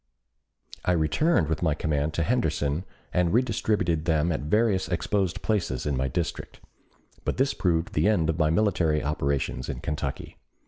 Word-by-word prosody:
I 90 Hz, -, +2 dB
returned 80 Hz, -, +2 dB
with 80 Hz, -1 st, -2 dB
my 80 Hz, -4 st, +2 dB
command 75 Hz, +1 st, -1 dB
to 85 Hz, -, +1 dB
Henderson 80 Hz, -, 0 dB, 0.3 s
and 90 Hz, -2 st, +2 dB
redistributed 105 Hz, -8 st, +1 dB
them 80 Hz, -1 st, +2 dB
at 80 Hz, -, -1 dB
various 100 Hz, +5 st, +1 dB
exposed 95 Hz, 0 st, -1 dB
places 95 Hz, -, -1 dB
in 75 Hz, -2 st, 0 dB
my 65 Hz, +1 st, 0 dB
district. 80 Hz, +6 st, -4 dB, 0.6 s
But -, -, -2 dB
this 135 Hz, +2 st, +2 dB
proved 85 Hz, -2 st, 0 dB
the -, -, +2 dB
end 100 Hz, -7 st, +2 dB
of 80 Hz, +1 st, -1 dB
my 75 Hz, -1 st, +3 dB
military 80 Hz, -4 st, +2 dB
operations 70 Hz, -3 st, -1 dB
in -, -, -4 dB
Kentucky. 75 Hz, -, -4 dB
80 Hz, 155 wpm, -26 LUFS, 75-100 Hz, 0.6 s, my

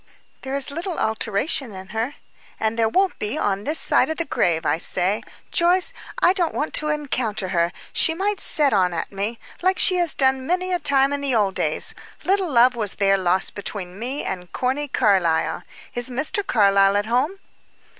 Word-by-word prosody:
"There 265 Hz, +1 st, -4 dB
is 280 Hz, 0 st, 0 dB
little 335 Hz, +4 st, -4 dB
alteration 220 Hz, +3 st, -1 dB
in 190 Hz, 0 st, -10 dB
her." 225 Hz, +6 st, -3 dB, 0.4 s
"And 220 Hz, 0 st, 0 dB
there 225 Hz, -1 st, +2 dB
won't 380 Hz, -, +1 dB
be 210 Hz, +1 st, -2 dB
on 200 Hz, 0 st, -1 dB
this 305 Hz, +2 st, 0 dB
side -, -, +3 dB
the 325 Hz, +1 st, -2 dB
grave. 165 Hz, -, 0 dB
I 160 Hz, -, +1 dB
say, 185 Hz, +4 st, +1 dB, 0.3 s
Joyce, 355 Hz, +2 st, +2 dB, 0.3 s
I 355 Hz, -, +6 dB
don't 350 Hz, -4 st, -1 dB
want 300 Hz, -, -2 dB
to 305 Hz, -, -1 dB
encounter 255 Hz, -10 st, -2 dB
her; 170 Hz, -1 st, +1 dB, 0.2 s
she 325 Hz, -, +3 dB
might 400 Hz, +3 st, -1 dB
set 290 Hz, -5 st, +4 dB
on 180 Hz, -3 st, +2 dB
at -, -, -4 dB
me, 205 Hz, +4 st, -3 dB, 0.2 s
like 375 Hz, +1 st, +2 dB
she 365 Hz, -, +3 dB
has 345 Hz, -2 st, +1 dB
done 265 Hz, -1 st, +2 dB
many 365 Hz, +1 st, 0 dB
a 355 Hz, -, +1 dB
time 280 Hz, -2 st, +2 dB
in 285 Hz, -, -3 dB
the 275 Hz, -3 st, 0 dB
old 205 Hz, -3 st, +2 dB
days. -, -, -1 dB, 0.3 s
Little 385 Hz, -2 st, +1 dB
love 250 Hz, 0 st, +5 dB
was 210 Hz, -4 st, -3 dB
there 195 Hz, -1 st, +3 dB
lost 185 Hz, +1 st, +1 dB
between 195 Hz, -2 st, -6 dB
me 255 Hz, +5 st, -4 dB
and 180 Hz, -1 st, -5 dB
Corny 265 Hz, +4 st, -1 dB
Carlyle. 190 Hz, -, +1 dB, 0.3 s
Is 245 Hz, +1 st, -2 dB
Mr. 285 Hz, +11 st, -1 dB
Carlyle 200 Hz, -, +3 dB
at 205 Hz, -, 0 dB
home?" 255 Hz, -, 0 dB
245 Hz, 185 wpm, -22 LUFS, 200-305 Hz, 0.4 s, I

